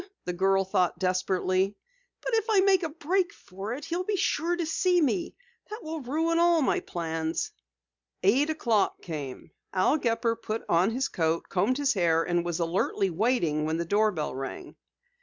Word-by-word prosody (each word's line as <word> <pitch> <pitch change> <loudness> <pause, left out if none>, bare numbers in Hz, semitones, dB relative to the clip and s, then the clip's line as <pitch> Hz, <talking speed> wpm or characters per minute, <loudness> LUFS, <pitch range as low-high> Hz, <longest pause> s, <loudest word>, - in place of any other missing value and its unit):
the 180 - -2
girl 195 +2 +2
thought 180 -2 +1
desperately. 185 +1 0 0.5
"But - - -4
if 445 0 +1
I 410 -3 +5
make 385 -1 +4
a 330 - -2
break 340 +4 0
for 195 +4 -7
it 285 - -8
he'll 350 +2 -2
be 415 +2 -1
sure 350 -2 0
to 345 -1 -2
see 355 +3 +2
me. 335 +3 0 0.3
That 430 +2 -7
will 315 0 -5
ruin 325 +6 0
all 340 -2 +4
my - - +2
plans." 165 -1 -3 0.7
Eight 260 +11 +4
o'clock 235 -10 0
came. 150 -3 -6 0.2
Al 190 +10 +3
Gepper 230 -1 +1
put 220 +1 -4
on 175 +4 +3
his 255 +4 -1
coat, 165 -1 -1
combed 205 +8 +1
his 285 -1 +2
hair 165 -4 +2
and 175 0 0
was 175 0 -3
alertly 180 +3 0
waiting 170 -6 +1
when 160 +1 -1
the 170 - -2
doorbell 200 -6 +1
rang. 135 +1 -6
210 Hz, 175 wpm, -28 LUFS, -, 0.7 s, I